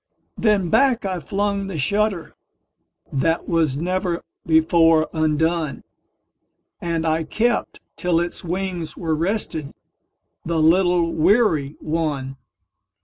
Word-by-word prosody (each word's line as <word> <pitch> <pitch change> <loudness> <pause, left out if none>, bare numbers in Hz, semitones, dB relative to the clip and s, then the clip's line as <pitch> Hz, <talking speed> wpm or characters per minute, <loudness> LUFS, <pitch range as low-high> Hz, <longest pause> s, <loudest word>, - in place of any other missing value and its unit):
Then 200 -6 +1
back 265 -6 +3
I 185 -2 -2
flung 200 +4 -2
the 195 - -6 1.4
shutterThat 165 +4 0
was 160 -6 +1
never 180 +1 -2 0.2
before 160 0 +4
undone, 160 0 0 1.0
And 165 -1 -2
I 160 0 +1
kept 230 +9 -1 0.2
till 175 -3 +1
its 175 0 -3
wings 175 -2 -4
were 160 -3 -1
restedThe 165 -4 -2 0.7
little 170 +1 +3
weary 160 - +2
one. 150 -4 -2
165 Hz, 95 wpm, -22 LUFS, 160-185 Hz, 1.4 s, before